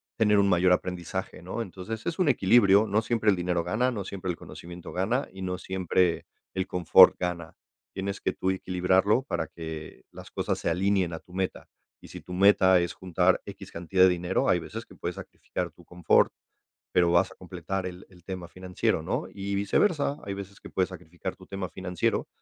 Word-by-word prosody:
tener 105 -2 +3
un 100 - +4
mayor 90 -1 +4
aprendizaje, 90 -1 -3
¿no?, 95 +7 -4
entonces, 100 +3 -7
es 170 - -3
un 180 -5 +3
equilibrio, 100 -3 +5
no 105 +2 +2
siempre 110 -2 +2
el - - +2
dinero 90 -1 -1
gana, 110 +9 +1
no 105 -5 -4
siempre 95 -1 -5
el 85 - -6
conocimiento 85 0 -10
gana, 110 +9 0
y 95 - -9
no 90 -1 -2
siempre 90 -2 0 0.3
el 95 0 -2
confort 90 +1 +7
gana. 85 -3 -4 0.4
Tienes 100 +1 -4
que - - 0
tú 95 - -1
equilibrarlo, 95 +5 +2
para 80 - -3
que 80 -1 -8
las - - -11
cosas - - -2
se - - -1
alineen 95 0 +1
a 80 - -5
tu 90 - -20
meta. 95 0 -3 0.3
Y - - -14
si - - -9
tu - - -13
meta 95 -1 +5
es 85 0 -1
juntar 90 0 +1
equis, - - -10
cantidad 90 +2 +2
de 95 - +8
dinero, 90 0 0
hay - - +4
veces - - -7
que - - -17
puedes - - -4
sacrificar - - -6
tu - - -19
confort, 90 -2 +3 0.6
pero, 90 -1 +4
vas 85 0 +3
a - - -14
completar 95 -1 -5
el 90 0 -8
el 90 -2 -18
tema 90 -2 -6
financiero, 90 +1 -1
¿no?, - - -2
y 100 0 -4
viceversa, 140 - +1
hay 100 - -4
veces 100 0 -9
que - - -10
puedes 95 -1 0
sacrificar 90 +1 -7
tu 95 - -15
tema 95 -2 -5
financiero, 90 -2 -1
95 Hz, 200 wpm, -27 LUFS, 90-100 Hz, 0.6 s, de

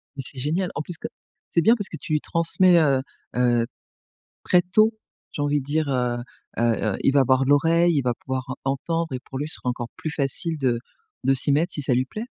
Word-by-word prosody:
Mais 135 - -5
c'est 130 - -6
génial! 170 +7 -1
En 145 - -2
plus 170 +2 -7
co - - -5 0.4
c'est 170 - +3
bien 225 +7 +5
parce 205 -4 -5
que - - -7
tu 155 - -4
lui 150 - +3
transmets, 170 +1 +3
heu, 135 -4 +3 0.3
heu, 120 -1 +2 0.8
très 180 - +4
tôt, 215 +5 +3 0.4
j'ai - - -3
envie 145 0 +1
de 135 - -8
dire, 150 0 0
heu, 125 -2 0 0.4
heu - - +2
heu, 110 -3 +1
il - - +4
va 140 - +5
avoir 130 +1 +3
l'oreille, 165 +4 +4
il 140 - +3
va 125 -1 0
pouvoir 130 +2 -5
entendre 165 +4 -2
et 130 - -3
pour 130 - -7
lui 145 - -2
ce - - -1
sera 125 - -3
encore 120 -1 -4
plus 155 - -4
facile 155 +3 -1
de 125 -4 0 0.4
de 135 - +3
s'y 135 +2 +3
mettre, 165 +5 +2
si 145 - -2
ça 135 -2 +1
lui 130 +1 +1
plaît. 215 - -6
145 Hz, 230 wpm, -24 LUFS, 130-165 Hz, 0.8 s, bien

